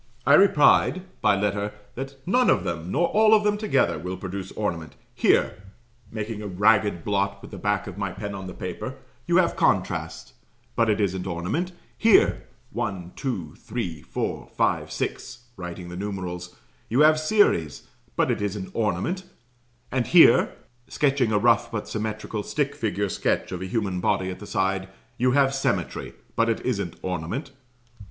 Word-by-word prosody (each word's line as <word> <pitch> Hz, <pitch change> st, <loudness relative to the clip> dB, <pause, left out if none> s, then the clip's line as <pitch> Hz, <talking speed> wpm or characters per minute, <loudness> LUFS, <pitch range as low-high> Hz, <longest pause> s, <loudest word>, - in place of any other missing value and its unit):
I 140 Hz, -, +5 dB
replied 185 Hz, +1 st, +5 dB, 0.2 s
(by 100 Hz, -, +4 dB
letter) 105 Hz, 0 st, -1 dB, 0.2 s
that 135 Hz, +2 st, -6 dB
"none 245 Hz, +7 st, +3 dB
of -, -, +3 dB
them, 85 Hz, +1 st, -4 dB
nor 175 Hz, -, +2 dB
all 220 Hz, +1 st, +5 dB
of 210 Hz, -, +3 dB
them 210 Hz, 0 st, +2 dB
together, 205 Hz, -, +1 dB
would 90 Hz, +3 st, -5 dB
produce 95 Hz, 0 st, -6 dB
ornament. 85 Hz, -7 st, -3 dB, 0.2 s
Here" -, -, +2 dB, 0.5 s
(making 110 Hz, -1 st, -4 dB
a 105 Hz, -, -5 dB
ragged 100 Hz, -2 st, +2 dB
blot 100 Hz, -1 st, 0 dB
with -, -, -12 dB
the 100 Hz, -, -8 dB
back 105 Hz, +1 st, 0 dB
of 100 Hz, 0 st, -8 dB
my 100 Hz, -1 st, -1 dB
pen 100 Hz, +2 st, -6 dB
on 95 Hz, -1 st, -6 dB
the 90 Hz, -, -8 dB
paper) -, -, -5 dB, 0.3 s
"you -, -, +3 dB
have -, -, +3 dB
contrast; -, -, 0 dB, 0.4 s
but 115 Hz, -1 st, +2 dB
it 105 Hz, -, +2 dB
isn't 95 Hz, -2 st, -1 dB
ornament: 95 Hz, -, -2 dB, 0.2 s
here, 225 Hz, -2 st, +4 dB, 0.2 s
1, 95 Hz, -8 st, -4 dB
2, 95 Hz, -, -4 dB
3, 100 Hz, -9 st, -5 dB
4, -, -, -4 dB
5, -, -, 0 dB
6," 125 Hz, -1 st, -4 dB
(writing 90 Hz, -1 st, -7 dB
the 90 Hz, -, -7 dB
numerals) 90 Hz, -3 st, -5 dB, 0.3 s
"You 125 Hz, +6 st, +3 dB
have 155 Hz, 0 st, +6 dB
series; 155 Hz, -, +2 dB, 0.3 s
but -, -, +2 dB
it -, -, -2 dB
isn't 100 Hz, -2 st, -3 dB
ornament: 115 Hz, -, -1 dB, 0.7 s
and 130 Hz, -2 st, 0 dB
here," 170 Hz, -9 st, +6 dB, 0.3 s
(sketching 135 Hz, -5 st, +1 dB
a 105 Hz, -, +3 dB
rough 115 Hz, +2 st, +3 dB
but 105 Hz, -3 st, -4 dB
symmetrical 110 Hz, 0 st, -3 dB
"stick 140 Hz, +5 st, -1 dB
figure" 100 Hz, -2 st, -1 dB
sketch 90 Hz, -, -1 dB
of 90 Hz, -1 st, -4 dB
a 95 Hz, -, -4 dB
human 95 Hz, -3 st, -1 dB
body 95 Hz, +1 st, 0 dB
at 90 Hz, -, -8 dB
the 105 Hz, -, -9 dB
side) 95 Hz, 0 st, -1 dB, 0.3 s
"you 125 Hz, +1 st, +3 dB
have 135 Hz, -1 st, +4 dB
symmetry; 135 Hz, -, -2 dB, 0.2 s
but 115 Hz, 0 st, +2 dB
it 115 Hz, -, 0 dB
isn't 100 Hz, -9 st, -2 dB
ornament." 95 Hz, -, -3 dB
105 Hz, 165 wpm, -25 LUFS, 95-130 Hz, 0.7 s, have